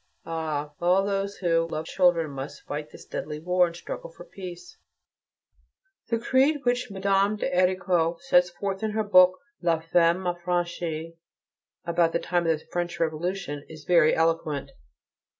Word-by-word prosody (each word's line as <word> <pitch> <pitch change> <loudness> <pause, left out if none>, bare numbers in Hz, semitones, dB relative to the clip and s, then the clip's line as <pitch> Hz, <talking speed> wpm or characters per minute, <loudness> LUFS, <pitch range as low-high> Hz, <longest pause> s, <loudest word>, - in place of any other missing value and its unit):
Ah! 155 -3 -3
all 180 +3 +3
those 200 0 -1
who 165 -2 +1
love 155 -1 -4
children 170 -4 +2
must 135 +1 -7
fight 150 +1 -4
in - - -25
this - - -13
deadly 150 0 -5
war, 180 +2 +3
and 170 - -9
struggle - - -7
for - - -13
peace: 180 -2 -10 1.3
The 230 - +2
creed 265 +5 +2
which 245 -1 0
Mme. 195 +1 +1
de 210 - -2
Héricourt 180 -2 +2
sets 180 0 +3
forth 195 +2 -4
in 215 -1 -2
her 220 0 0
book, 185 -3 +6 0.2
"La 170 -2 +2
Femme 170 +2 +2
Affranchie," 175 -2 -2 0.7
about 170 -1 +2
the 170 - +1
time 175 -1 0
of 165 -1 +3
the - - -20
French 175 0 -3
Revolution, 165 -1 -2
is 155 -1 -11
very 165 -1 +4
eloquent. 165 -3 0
175 Hz, 155 wpm, -26 LUFS, 165-190 Hz, 1.3 s, book